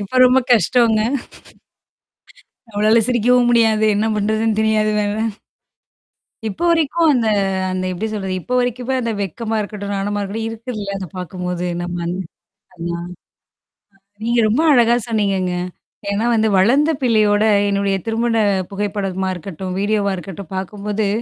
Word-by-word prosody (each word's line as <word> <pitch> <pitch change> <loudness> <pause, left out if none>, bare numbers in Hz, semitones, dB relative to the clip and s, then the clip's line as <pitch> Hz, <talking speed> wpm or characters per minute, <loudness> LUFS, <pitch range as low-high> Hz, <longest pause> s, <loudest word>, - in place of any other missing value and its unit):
இப்ப 205 +6 -2
ரொம்ப 255 +1 +5
கஷ்டம்ங்க! 230 -1 +3 1.7
நம்மளால 215 +2 +3
சிரிக்கவும் 245 0 +3
முடியாது. 220 -2 +3
என்ன 215 +2 +1
பண்றதுன்னு 215 +1 0
தெரியாது 215 -1 +2
வேற. 205 0 0 1.4
இப்ப 195 - -8
வரைக்கும் 330 0 +2
அந்த 235 -3 +1 0.4
அந்த 185 0 -2
எப்படி 195 +5 -3
சொல்றது? 190 -3 -3
இப்போ 250 - -5
வரைக்குமே 245 +1 -1
அந்த 230 - -1
வெக்கமா 220 +4 -3
இருக்கட்டும், 205 -1 -5
நானமா 205 +1 -2
இருக்கட்டும் 220 +3 -4
இருக்குல்ல 220 -3 -5
அத 190 - -5
பார்க்கும்போது 180 0 -4
நம்ம 175 0 -4
அந் 175 +1 -2 0.6
அண்ணா. 170 0 -4 1.2
நீங்க 235 +1 +1
ரொம்ப 230 +8 +2
அழகா 240 -1 +5
சொன்னீங்கங்க. 195 -5 0 0.6
ஏன்னா 205 +3 0
வந்து 220 -1 +2
வளர்ந்த 270 +11 +4
பிள்ளையோட 215 -4 +3 0.3
என்னுடைய 200 -1 +1
திருமண 230 +1 0 0.4
புகைப்படமா 195 -2 -2
இருக்கட்டும், 185 +1 -6
வீடியோவா 205 0 +1
இருக்கட்டும் 190 0 -9
பார்க்கும்போது, 205 +2 -3
210 Hz, 125 wpm, -19 LUFS, 195-230 Hz, 1.7 s, ரொம்ப